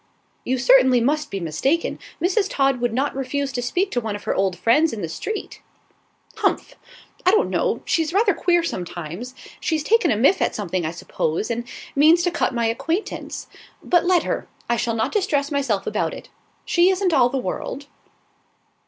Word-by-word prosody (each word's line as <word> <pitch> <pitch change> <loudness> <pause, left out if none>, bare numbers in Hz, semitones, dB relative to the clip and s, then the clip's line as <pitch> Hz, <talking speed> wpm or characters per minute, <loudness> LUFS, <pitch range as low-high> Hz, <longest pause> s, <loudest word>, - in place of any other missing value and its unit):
"You 260 +1 0
certainly 255 0 +5
must 295 +5 0
be 195 - -4
mistaken. 225 - -1 0.2
Mrs. 390 +3 +1
Todd 270 -3 +1
would 240 -1 +1
not 265 +5 -1
refuse 275 +1 -2
to 245 -1 -3
speak 360 +11 -1
to 245 - 0
one 220 -2 -3
of 205 - -8
her - - -1
old 190 -2 0
friends 295 - +3
in 210 -4 -5
the - - -1
street." 415 - -5 0.8
"Humph! - - 0 0.5
I 360 - +4
don't 430 +3 +3
know; - - 0
she's 325 -1 +1
rather 400 +2 +3
queer, 345 0 +2
sometimes. 180 - -5 0.2
She's 315 -3 -1
taken 455 +8 +3
a 215 - +2
miff 275 - +3
at - - +1
something, 185 -5 -2
I - - -3
suppose, 170 +4 -2
and 235 +1 -3 0.3
means 320 +5 +5
to 355 - +1
cut 340 - 0
my 235 -2 -1
acquaintance. 325 - -3 0.4
But 350 -2 +3
let 360 -1 +3
her. - - -3 0.2
I 235 - +2
shall 230 0 -1
not 220 - 0
distress 310 -9 0
myself 270 -9 0
about - - -1
it; - - -11 0.4
she 350 +1 +4
isn't 375 -2 +1
all 250 -4 +5
the 270 - -2
world." 275 +2 -4
270 Hz, 185 wpm, -22 LUFS, 230-340 Hz, 0.8 s, certainly